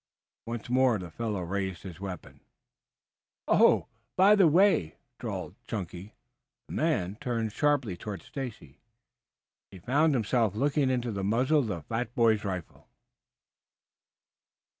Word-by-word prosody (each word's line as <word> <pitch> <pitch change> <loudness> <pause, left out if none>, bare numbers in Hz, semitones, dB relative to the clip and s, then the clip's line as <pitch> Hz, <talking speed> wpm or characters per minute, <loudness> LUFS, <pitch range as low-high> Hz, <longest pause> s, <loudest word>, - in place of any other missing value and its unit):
Once 115 -1 -5
more 125 -2 +3
the 90 -4 -8
fellow 105 -1 -3
raised 95 0 -3
his 90 -3 -9
weapon. 95 -2 -8 1.1
"Oh, - - +5 0.3
by 195 +3 +6
the 195 -4 +6
way!" 165 - +3 0.2
drawled - - -5
Chunky. 95 -1 -6 0.5
The - - -9
man 95 +3 0
turned 115 -3 -2
sharply 145 -10 +1
toward 100 -2 -7
Stacy. 120 - -8 0.9
He 95 - -12
found 140 - +2
himself 115 -3 +1
looking 140 +3 +1
into 125 -2 -1
the 100 -2 -3
muzzle 125 +9 +2
of 130 - 0
the 90 -7 -4
fat 115 +6 -4
boy's 110 -3 +3
rifle. 95 -4 -6
110 Hz, 125 wpm, -29 LUFS, 95-130 Hz, 1.1 s, by